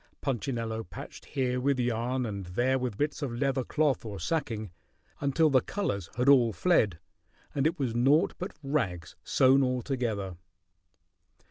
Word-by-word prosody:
Punchinello 115 -4 -2
patched 85 - -10
here 125 -2 -1
with 135 0 +1
yarn 120 +1 0
and 100 -3 -4
there 125 +9 +1
with 125 -5 -3
bits 150 +3 -1
of 130 -5 -3
leather 135 -1 +1
cloth 150 0 +1
or 105 -4 -6
sacking, 115 - -2 0.5
until 145 +2 +2
the 130 -2 +5
colors 100 - -3
had 125 +2 0
all 125 -5 +6
fled, 105 - +2 0.6
and 140 +1 +2
it 160 - -2
was 130 -5 -1
naught 135 +7 +3
but 185 - -6
rags 90 - -2
sewn 130 +1 +4
all 125 -2 0
together. 110 -9 -2
125 Hz, 150 wpm, -29 LUFS, 110-140 Hz, 0.6 s, all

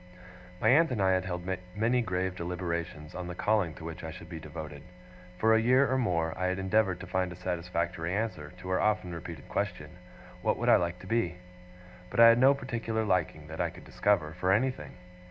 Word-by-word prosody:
My - - +3
aunt 165 +6 +5
and 125 -4 -2
I 95 -1 +3
had 95 0 +1
held 90 -1 -4 0.3
many 120 +4 +2
grave 95 -3 -1
deliberations 85 -3 -4
on 90 -1 -5
the 90 - -6
calling 100 -5 +1
to 80 - -11
which 80 +1 -7
I 80 - -4
should 85 +1 -10
be 85 -2 -6
devoted. 75 -2 -8 0.6
For 110 +4 +4
a 110 - +4
year 130 +4 +4
or - - +3
more 85 -8 0
I 90 - -1
had 95 0 0
endeavoured 95 -1 +1
to - - -6
find 95 -1 -1
a - - -7
satisfactory 85 0 -2
answer 100 -9 -3
to 90 - -8
her 95 - +1
often 105 -5 +1
repeated 85 -3 -8
question, 100 -3 -3 0.5
'What - - +1
I - - +7
would - - -1
like 85 0 -2
to - - -11
be?' 95 -6 0 0.7
But - - -3
I 115 0 +10
had 115 +1 +5
no 135 +2 +6
particular 115 -4 -2
liking, 90 -6 0
that 80 +2 -5
I 85 - +1
could 90 +2 -13
discover, 90 -7 +1
for 90 +1 +2
anything. 100 - 0
90 Hz, 210 wpm, -30 LUFS, 85-110 Hz, 0.7 s, I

